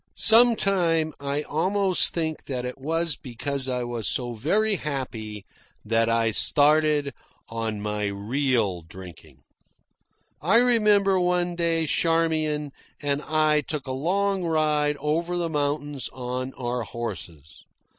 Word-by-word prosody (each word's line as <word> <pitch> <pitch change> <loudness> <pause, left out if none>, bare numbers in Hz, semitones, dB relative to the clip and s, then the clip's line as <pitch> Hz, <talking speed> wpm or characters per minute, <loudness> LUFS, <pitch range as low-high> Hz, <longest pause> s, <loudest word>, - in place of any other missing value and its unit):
Sometimes 195 -9 +4
I 140 +1 -2
almost 185 +5 0
think 160 -2 -3
that 125 -2 -4
it 125 +2 -6
was 165 +3 -1
because 135 +1 -3
I 125 -1 -1
was 120 -2 -4
so 120 -2 +3
very 200 - +1
happy 115 - -5 0.4
that 115 +1 +1
I 115 -1 +2
started 150 +2 +3 0.4
on 115 -2 -4
my 105 0 -2
real 105 -1 -1
drinking. 80 -5 -13 1.0
I 185 +10 +4
remember 210 -5 +4
one 180 -1 0
day 165 -1 0
Charmian 155 -2 0 0.3
and 145 0 -1
I 155 -1 +2
took 150 0 -5
a 130 - -5
long 190 +7 0
ride 150 -3 +1
over 165 +5 -1
the 170 -2 -2
mountains 145 -2 -2
on 130 +1 -4
our 125 0 -3
horses. 90 -11 -7
145 Hz, 125 wpm, -25 LUFS, 120-165 Hz, 1.0 s, Sometimes